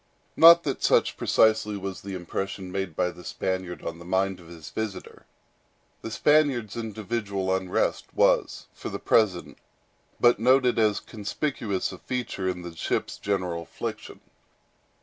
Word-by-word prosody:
Not 170 +1 +9
that 135 -3 -3
such - - +3
precisely 110 -1 +2
was 95 -1 -6
the 100 -1 -6
impression 95 +1 -5
made 95 -4 -3
by 90 +2 0
the 90 - -13
Spaniard 95 -1 -3
on 85 0 -5
the - - -10
mind 95 +1 0
of 85 - -15
his 80 -2 -11
visitor. 105 -4 -6 0.7
The - - -5
Spaniard's 135 -4 +2
individual 105 -4 -2
unrest 95 -1 -1
was, - - +2
for - - -7
the - - -4
present, 100 -6 +1 0.6
but 120 -2 +5
noted 125 0 +4
as 105 -2 +3
a - - -6
conspicuous 105 -2 -3
feature 120 -7 -2
in 90 -1 -4
the 85 -1 -8
ship's - - -2
general 90 -4 -2
affliction. 85 - -7
100 Hz, 145 wpm, -26 LUFS, 90-115 Hz, 0.7 s, Not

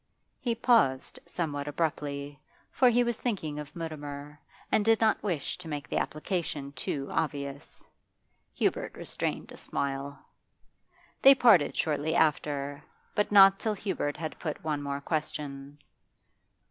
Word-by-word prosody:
He 235 -2 -1
paused 225 - +2
somewhat 145 -4 -3
abruptly, 145 -2 -3 0.3
for 255 - +5
he 245 +1 +4
was 240 -2 -2
thinking 160 -11 -2
of 150 0 -9
Mutimer, 150 -3 -6 0.3
and 210 - +3
did 225 +1 +4
not 220 -1 +3
wish 175 -8 -2
to 180 - -9
make 145 -2 -4
the - - 0
application 155 -3 -3
too 135 +1 -3
obvious. 140 -3 -3 0.7
Hubert - - 0
restrained - - -4
a - - -10
smile. 140 0 -3 1.0
They 275 +1 +9
parted 215 - +5
shortly 155 +1 0
after, 145 -2 0 0.3
but 210 - 0
not 195 -1 +8
till 220 -1 -1
Hubert 185 -7 -2
had 160 0 -5
put 155 -3 -4
one 150 -2 -1
more 140 0 -3
question. 145 -2 -4
150 Hz, 135 wpm, -29 LUFS, 140-195 Hz, 1.0 s, They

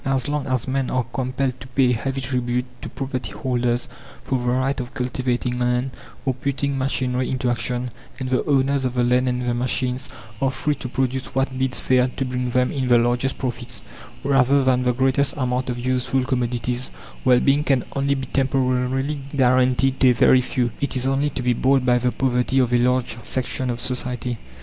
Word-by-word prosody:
As 135 -2 0
long 145 -1 -2
as 130 -2 -1
men 135 0 0
are 130 -1 +1
compelled 130 0 -1
to 130 - -10
pay 130 -1 +2
a - - +2
heavy 135 +3 -3
tribute 125 -1 -1 0.2
to - - -6
property 130 -4 -4
holders 120 -1 -1 0.4
for 130 - -1
the 120 0 -1
right 130 +3 0
of 125 +1 -6
cultivating 125 -1 -1
land 125 +1 0 0.3
or 135 - +2
putting 140 +2 -2
machinery 130 -1 -1
into 130 -2 0
action, 125 +1 -2 0.3
and 130 - -4
the 130 - +2
owners 140 -1 +2
of 125 -1 -1
the 125 - +2
land 125 +1 +3
and 125 0 -2
the 120 - +1
machine 125 +1 -1 0.4
are 135 - +3
free 150 +3 -1
to 130 - -6
produce 130 +1 -2
what 135 0 0
bids 130 -1 0
fair 125 -1 +3
to 135 - 0
bring 125 0 -2
them 125 +1 +1
in 135 -3 -1
the 120 -1 +6
largest 120 +3 +1
profits 125 -1 -4 0.4
rather 135 0 +4
than 130 -1 +3
the 125 0 +2
greatest 135 +3 +1
amount 125 -1 -1
of 125 - -2
useful 130 +1 0
commodities 125 -1 -1 0.3
well 125 -1 +5
being 140 +3 +3
can 135 -4 +2
only 140 0 +1
be 135 -1 -3
temporarily 135 +1 0 0.2
guaranteed 130 0 +3
to 130 - +6
a - - +5
very 130 +2 +5
few; 125 -1 -1
it 140 - -1
is 130 0 0
only 135 +2 +1
to 130 -2 -5
be 125 0 +3
bought 130 +2 +2
by 125 -1 +4
the 125 0 +1
poverty 130 0 0
of 125 -2 +3
a - - +6
large 125 -1 +1
section 130 +1 -2
of 120 -1 -2
society. 125 -1 -3
130 Hz, 200 wpm, -22 LUFS, 125-135 Hz, 0.4 s, the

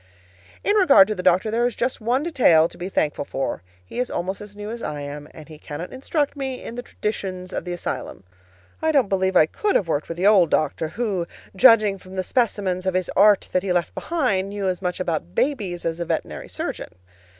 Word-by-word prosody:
In 410 - +2
regard 275 - +7
to - - +1
the 185 - -5
doctor, 185 +5 +3
there 235 +2 +2
is 245 - -4
just 250 -1 -2
one 245 +6 +1
detail 230 - +4
to - - -14
be 180 +2 -4
thankful 150 -6 0
for: 135 -7 -3 0.2
he 165 - -7
is 250 - 0
almost 190 +3 -3
as 205 0 -10
new 210 +1 -6
as 235 0 -6
I 145 -1 -4
am, 145 +1 -7
and 155 - -13
he 155 -2 -12
cannot 150 +5 -7
instruct 285 +3 -1
me 265 -2 -4
in - - -7
the 245 - -5
traditions 190 -5 -5
of - - -3
the 180 - -3
asylum. 175 - -5 0.6
I 320 0 +2
don't 270 -9 +3
believe 190 -1 +1
I 155 - +7
COULD 410 - -1
have 190 - +2
worked 150 -2 -1
with 165 - -6
the 180 - 0
old 195 -5 +6
doctor, 155 +1 0
who, 195 -2 -2 0.3
judging 215 -3 +5
from 185 +1 -12
the 185 - -1
specimens 190 -5 0
of 185 - 0
his 185 -1 0
art 205 0 +5
that 185 - +2
he 190 -1 -2
left 175 -1 0
behind, 215 - -1
knew 200 -1 -3
as 185 0 -1
much 180 -1 -2
about 160 - -3
babies 200 -11 -1
as 165 0 -2
a 170 - -2
veterinary - - -4
surgeon. - - -5
190 Hz, 225 wpm, -23 LUFS, 175-235 Hz, 0.6 s, regard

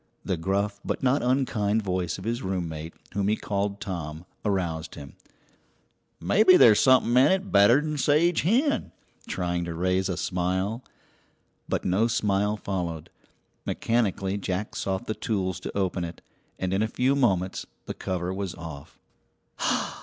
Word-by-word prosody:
The - - 0
gruff 100 +4 -1
but - - -3
not 135 +2 +3
unkind 115 -5 +1
voice 90 -3 -1
of 95 - -9
his 120 +3 -2
roommate, 85 -5 -4 0.2
whom 100 -1 0
he 105 - +3
called 100 -1 -2
Tom, 85 -4 -5 0.2
aroused 85 -6 -2
him. 70 -1 -10 1.1
"Maybe 185 - +5
there's 110 -3 +7
something 130 -3 +5
in 130 +6 +5
it 190 0 0
better'n 145 +9 +4
sage 160 +5 +3
hen," 230 - +1 0.3
trying 90 -1 -2
to 85 -1 -5
raise 90 +2 +1
a 90 - -2
smile. 95 +6 -1 0.9
But - - -1
no 95 +5 +2
smile 105 -2 +1
followed. 85 -5 -4 0.5
Mechanically 100 -4 0
Jack 95 +2 -3
sought 95 -1 -2
the 110 - -2
tools 95 -5 -2
to - - -6
open 95 -2 0
it, 85 0 -7 0.3
and 95 0 -2
in 95 - +1
a 110 - +2
few 130 +5 +1
moments 95 -9 +1 0.2
the - - -4
cover 90 0 -3
was 95 -2 -4
off. 80 -4 -9
100 Hz, 145 wpm, -26 LUFS, 90-115 Hz, 1.1 s, there's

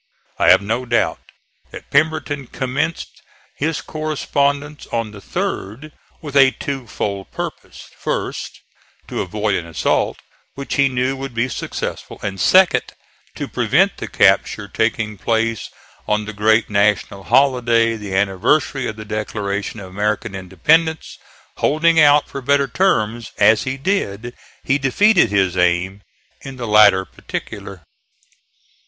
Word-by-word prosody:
I - - +4
have - - +6
no 115 +5 -1
doubt 120 0 +1 0.5
that - - -12
Pemberton 145 -2 0
commenced 140 +7 -3 0.3
his 155 +2 -2
correspondence 145 -1 -2
on 115 -2 -3
the 100 -1 -12
third 115 +11 -4 0.3
with 145 -2 -7
a 135 -1 +7
two 135 -2 -5
fold 100 -4 -4
purpose: - - -7
first, - - -4 0.5
to - - -3
avoid 105 +2 -2
an 85 -3 -2
assault, 80 - 0 0.4
which 140 0 -5
he 140 -1 +3
knew 130 +1 -1
would 135 -2 -7
be 115 +2 +1
successful, 130 - -5
and 95 -2 -4
second, 185 -1 +4 0.4
to - - -4
prevent - - +1
the - - -6
capture 100 - +2
taking 110 0 -1
place 115 -1 -1 0.4
on 105 0 0
the 110 - -6
great 110 +2 +2
national 100 -1 0
holiday, 120 -2 +3
the 105 -3 -5
anniversary 100 +8 +1
of 110 - -5
the 110 0 -9
Declaration 105 -1 -4
of 95 -2 -10
American 105 0 -2
Independence. 150 - 0 0.4
Holding 165 +2 +3
out 145 -1 +5
for 140 - -7
better 140 +1 +2
terms 115 - 0
as 110 +4 +4
he 130 0 -3
did 120 - -2 0.3
he 135 +1 +1
defeated 145 - +3
his 95 -3 +1
aim 90 +2 +1 0.4
in 135 -1 -8
the 120 - -5
latter 105 -3 +5
particular. 95 -2 -8
115 Hz, 135 wpm, -19 LUFS, 100-140 Hz, 0.5 s, a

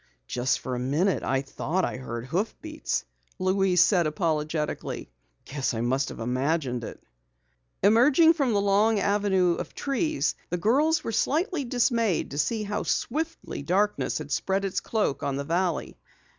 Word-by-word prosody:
"Just 125 - 0
for 130 - -5
a 125 - -2
minute 150 +10 +1
I 135 +1 0
thought 170 +6 -1
I - - -4
heard 120 -2 -6
hoofbeats," 220 - -3 0.3
Louise 185 -1 +3
said 175 -6 +3
apologetically. 155 - -2 0.3
"Guess 135 -3 -2
I 110 - -2
must 130 +3 0
have - - -9
imagined 125 +1 -1
it." - - -7 0.8
Emerging 265 - +6
from 280 -7 0
the 200 - +2
long 205 +2 +3
avenue 195 -3 +2
of - - -6
trees, 300 +3 0 0.2
the 175 - -1
girls 295 - +2
were - - -3
slightly 315 - 0
dismayed 235 -5 +1
to 145 - -4
see 215 +8 0
how 210 0 -2
swiftly 320 - -2
darkness 195 +8 0
had 150 -1 -7
spread 195 +6 0
its 190 - -1
cloak 215 -11 -1
on 140 -1 -1
the 140 - -2
valley. 170 +2 -1
185 Hz, 155 wpm, -26 LUFS, 140-225 Hz, 0.8 s, Emerging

